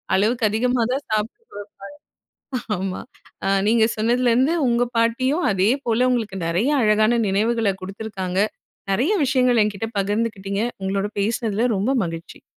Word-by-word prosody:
அளவுக்கு 220 Hz, +4 st, +1 dB
அதிகமா 245 Hz, +3 st, +1 dB
தான் 275 Hz, +2 st, -2 dB
சாப்பிடவைப்பாங்க. 215 Hz, -, -3 dB, 1.2 s
ஆமா, 185 Hz, 0 st, -3 dB, 0.5 s
அ -, -, +1 dB, 0.2 s
நீங்க 225 Hz, -1 st, +4 dB
சொன்னதுலேர்ந்து 245 Hz, +6 st, +2 dB
உங்க 240 Hz, +1 st, +2 dB
பாட்டியும் 255 Hz, +8 st, +1 dB
அதேபோல 235 Hz, +5 st, +1 dB
உங்களுக்கு 220 Hz, -6 st, -1 dB
நிறைய 185 Hz, -, +1 dB
அழகான 215 Hz, +2 st, +3 dB
நினைவுகள 215 Hz, +1 st, +1 dB
குடுத்துருக்காங்க. 190 Hz, -2 st, -5 dB, 0.5 s
நிறைய 265 Hz, -, +1 dB
விஷயங்கள் 250 Hz, -3 st, +3 dB
என்கிட்ட 210 Hz, +1 st, -3 dB
பகிர்ந்துகிட்டீங்க. 205 Hz, 0 st, -2 dB, 0.2 s
உங்களோட 195 Hz, +1 st, -1 dB
பேசினதுல 225 Hz, +2 st, 0 dB
ரொம்ப 245 Hz, +8 st, 0 dB
மகிழ்ச்சி. 165 Hz, 0 st, -8 dB
220 Hz, 115 wpm, -22 LUFS, 200-245 Hz, 1.2 s, நீங்க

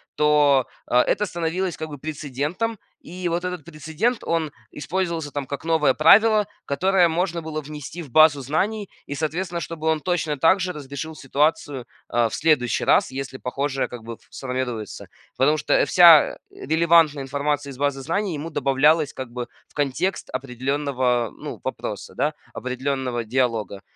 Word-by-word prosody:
то, 145 Hz, -3 st, +4 dB, 0.2 s
э, -, -, -5 dB
это 210 Hz, +10 st, +2 dB
становилось 175 Hz, 0 st, -2 dB
как 160 Hz, -, -5 dB
бы 145 Hz, -, -7 dB
прецедентом. 155 Hz, -, -3 dB, 0.2 s
И 180 Hz, 0 st, -5 dB
вот 170 Hz, +2 st, -2 dB
этот 180 Hz, -3 st, -4 dB
прецедент- 160 Hz, -, -2 dB
он 165 Hz, -2 st, -1 dB, 0.2 s
использовался 165 Hz, 0 st, -3 dB
там, 145 Hz, -1 st, -4 dB
как 140 Hz, 0 st, -5 dB
новое 160 Hz, -4 st, +3 dB
правило, 210 Hz, -, +6 dB, 0.2 s
которое 180 Hz, +5 st, +3 dB
можно 170 Hz, +1 st, -1 dB
было 155 Hz, -1 st, -4 dB
внести 150 Hz, +3 st, -8 dB
в 140 Hz, -, -14 dB
базу 155 Hz, 0 st, +6 dB
знаний 195 Hz, -, -1 dB, 0.2 s
и, 145 Hz, -, -5 dB
соответственно, 170 Hz, +3 st, -2 dB
чтобы 160 Hz, 0 st, -5 dB
он 160 Hz, -1 st, +2 dB
точно 160 Hz, -4 st, -1 dB
так 165 Hz, +7 st, +4 dB
же 185 Hz, 0 st, -1 dB
разрешил 150 Hz, +2 st, -7 dB
ситуацию, 140 Hz, -2 st, 0 dB, 0.2 s
а, 120 Hz, -1 st, +2 dB
в -, -, -11 dB
следующий 150 Hz, -6 st, +2 dB
раз, -, -, +4 dB
если 135 Hz, 0 st, -5 dB
похожее, 135 Hz, +2 st, -2 dB
как 120 Hz, -2 st, -9 dB
бы, 115 Hz, +1 st, -6 dB
ф -, -, -14 dB
сформируется. 125 Hz, -5 st, -5 dB, 0.3 s
Потому 150 Hz, +4 st, +3 dB
что 150 Hz, -, +2 dB
вся, 170 Hz, -4 st, +7 dB
э, -, -, -18 dB, 0.3 s
релевантная 160 Hz, -2 st, +4 dB
информация 140 Hz, +1 st, -2 dB
из 130 Hz, -, -11 dB
базы 140 Hz, -1 st, -1 dB
знаний 180 Hz, +6 st, -1 dB
ему 150 Hz, +3 st, -5 dB
добавлялась 145 Hz, +2 st, +2 dB
как 130 Hz, -2 st, -6 dB
бы 120 Hz, 0 st, -5 dB, 0.2 s
в -, -, -28 dB
контекст 150 Hz, +7 st, -1 dB
определенного, 130 Hz, -2 st, -1 dB
ну, -, -, -7 dB
вопроса, -, -, -5 dB
да, -, -, 0 dB, 0.2 s
определенного 130 Hz, -1 st, -2 dB
диалога. 115 Hz, -4 st, -1 dB
150 Hz, 160 wpm, -23 LUFS, 135-165 Hz, 0.3 s, вся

